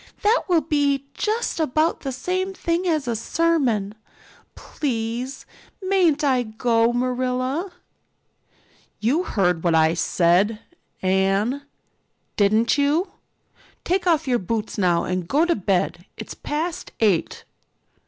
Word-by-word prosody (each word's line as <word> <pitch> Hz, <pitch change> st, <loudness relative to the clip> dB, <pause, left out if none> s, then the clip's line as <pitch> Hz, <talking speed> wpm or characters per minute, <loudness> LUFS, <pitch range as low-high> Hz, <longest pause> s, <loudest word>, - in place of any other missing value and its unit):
That 435 Hz, +4 st, +3 dB
will 345 Hz, -4 st, +3 dB
be 285 Hz, -2 st, 0 dB
just 435 Hz, -3 st, -1 dB
about 310 Hz, +1 st, +1 dB
the 270 Hz, -, -4 dB
same 370 Hz, +8 st, -2 dB
thing 340 Hz, +1 st, -1 dB
as 310 Hz, -6 st, 0 dB
a 235 Hz, -, 0 dB
sermon. 240 Hz, -7 st, 0 dB, 0.6 s
Please, 245 Hz, -1 st, -4 dB, 0.3 s
mayn't 370 Hz, -6 st, +2 dB
I 260 Hz, -3 st, +3 dB
go, 230 Hz, +1 st, +1 dB
Marilla?" 255 Hz, +7 st, -1 dB, 1.3 s
"You 260 Hz, +10 st, +1 dB
heard 180 Hz, -5 st, 0 dB
what 170 Hz, -2 st, +2 dB
I 160 Hz, 0 st, +4 dB
said, 180 Hz, +5 st, +2 dB, 0.5 s
Anne, 195 Hz, +7 st, +1 dB, 0.7 s
didn't 220 Hz, +6 st, +3 dB
you? 300 Hz, +7 st, +1 dB, 0.7 s
Take 365 Hz, +1 st, 0 dB
off 320 Hz, -3 st, +2 dB
your 245 Hz, -2 st, +2 dB
boots 220 Hz, +3 st, -3 dB
now 175 Hz, -4 st, +2 dB
and 180 Hz, -1 st, -3 dB
go 300 Hz, -, +3 dB
to 345 Hz, -, +2 dB
bed. 185 Hz, -3 st, -1 dB
It's -, -, -7 dB
past 330 Hz, +4 st, -4 dB
eight." 205 Hz, -7 st, +1 dB
255 Hz, 120 wpm, -23 LUFS, 210-325 Hz, 1.3 s, I